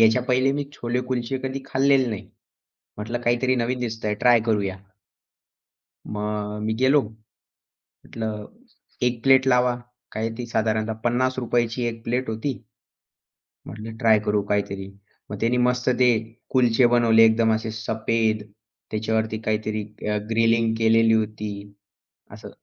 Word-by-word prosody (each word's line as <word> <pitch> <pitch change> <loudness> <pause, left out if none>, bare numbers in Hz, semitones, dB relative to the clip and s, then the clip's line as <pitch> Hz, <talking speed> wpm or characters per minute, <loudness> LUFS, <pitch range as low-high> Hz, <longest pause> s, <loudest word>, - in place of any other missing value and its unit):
याच्या 115 +2 +5
पहिले 130 +2 +2
मी 145 0 -2
छोले-कुलचे 125 0 -2
कधी 135 +1 -3
खाल्लेले 135 -1 +3
नाही. 110 -4 -6 0.7
म्हटलं, 115 +3 -4
"काहीतरी 120 +2 +1
नवीन 125 +1 -1
दिसतंय. 110 -3 -2
ट्राय 120 -2 +6
करूया." 100 -4 0 1.4
मग 105 0 -3
मी 110 0 0
गेलो. 135 +2 +4 0.8
म्हटलं, 110 -2 -7 0.6
"एक 120 -2 0
प्लेट 135 0 +5
लावा." 125 -1 +3 0.4
काय 110 +1 -2
ती 120 - -4
साधारणतः 110 -1 0
₹50 120 -1 +1
ची 125 +1 -3
एक 115 -1 -6
प्लेट 125 +1 -1
होती. 110 +6 -2 1.1
म्हटलं 110 +1 -8
ट्राय 110 -2 +4
करू 105 0 +1
काहीतरी. 100 -1 -1 0.4
मग 105 - -5
त्याने 120 +3 +1
मस्त 125 0 0
ते 125 -1 +5 0.4
कुलछे 125 -1 +3
बनवले. 115 -2 +5
एकदम 110 0 +3
असे 110 0 -2
सफेद 110 0 -1 0.5
त्याच्यावरती 110 0 -1
काहीतरी 110 -1 -1 0.3
अ, 105 - +1
ग्रिलिंग 115 0 +2
केलेली 115 0 +4
होती, 110 -1 -1 0.8
असं - - -10
115 Hz, 125 wpm, -23 LUFS, 110-125 Hz, 1.4 s, ट्राय